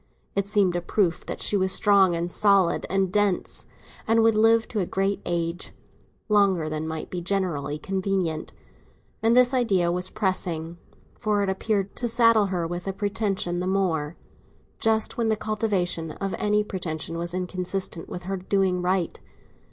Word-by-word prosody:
It 200 0 0
seemed 200 -4 +2
a 175 - 0
proof 175 -1 0
that - - -4
she - - +2
was 190 -1 +2
strong 195 -3 +4
and 170 +1 -2
solid 195 -4 +3
and 190 -1 0
dense, 205 -3 0 0.4
and 225 0 +4
would 225 0 +5
live 225 +1 +4
to 220 - -2
a 180 - -1
great 195 +1 -1
age—longer 175 +2 -1
than 155 0 -3
might 160 0 -5
be 180 - -3
generally 175 -6 -1
convenient; 190 -2 -2 0.7
and 230 +2 +3
this 250 +1 +5
idea 195 -9 +2
was 180 +1 0
depressing, 175 -5 -2 0.4
for 210 -1 +1
it 195 - -1
appeared 195 0 -1
to 245 - -1
saddle 230 -3 +4
her 180 -3 -2
with 175 +2 -5
a 195 - -1
pretension 200 -3 -1
the 180 - -2
more, 175 -5 0 0.6
just 220 0 +1
when 230 - +1
the 220 - +3
cultivation 195 -7 -1
of 195 -1 -4
any 210 0 +2
pretension 165 -5 -4
was 170 +1 -4
inconsistent 185 -1 -3
with 180 - -6
her 195 +2 -3
doing 190 -1 0
right. 180 -1 -1
190 Hz, 160 wpm, -25 LUFS, 175-205 Hz, 0.7 s, would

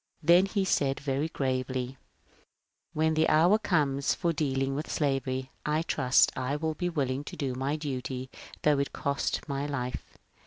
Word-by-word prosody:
Then 175 +5 +6
he 195 -1 0
said 140 -6 +1
very 140 +2 -1
gravely, 130 -3 -1
^ 135 - -13 1.0
When 160 +1 +2
the 160 0 +3
hour 175 +7 +5
comes 145 -9 +1
for 170 -1 0
dealing 135 -3 0
with 150 +3 -4
slavery 135 -2 -1
I 155 +2 0
trust 135 -5 +3
I 130 +2 -1
will 160 +1 -1
be 175 +3 -2
willing 140 -4 -1
to - - -7
do 140 -4 -2
my 135 +3 -1
duty 130 -3 -4 0.3
though 150 -2 +4
it 140 - -2
cost 140 +1 -2
my 140 0 -2
life. 125 -3 -5
140 Hz, 165 wpm, -29 LUFS, 130-155 Hz, 1.0 s, Then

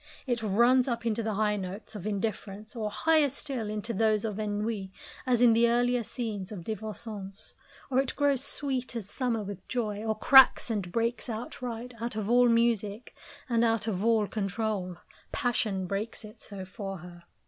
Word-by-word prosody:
It 240 -3 -1
runs 235 +5 +4
up 235 -2 -2
into 230 0 0
the 220 -2 -2
high 210 0 +1
notes 195 +3 -6
of 205 0 -5
indifference, 210 0 -4
or, 215 -2 -2
higher 310 +5 +3
still, 260 -5 -3
into 215 +2 -3
those 215 0 +2
of 215 -1 -3
ennui, 210 -2 -2 0.4
as 245 -1 +3
in 235 -2 +7
the 230 +1 +4
earlier 245 0 +2
scenes 215 -5 -4
of 190 -5 -6
Divorcons; 210 -1 -6 0.4
or 260 - +3
it 270 -1 -1
grows 280 -2 +2
sweet 265 -3 -1
as 220 -5 -4
summer 235 -1 -1
with 195 -2 -8
joy, 215 -4 -2
or 220 -1 -1
cracks 260 0 +7
and 195 -5 -2
breaks 230 +3 -1
outright, 240 +1 -5
out 235 -1 -3
of 215 0 -2
all 245 0 +6
music, 230 -2 +1 0.3
and 235 -2 +2
out 225 -2 +2
of 200 -3 -1
all 225 -2 +3
control. 195 -3 -2 0.3
Passion 215 -6 0
breaks 205 +4 -4
it 215 - -13
so 195 -2 -6
for 195 0 -6
her. 175 0 -12
220 Hz, 175 wpm, -29 LUFS, 205-240 Hz, 0.4 s, in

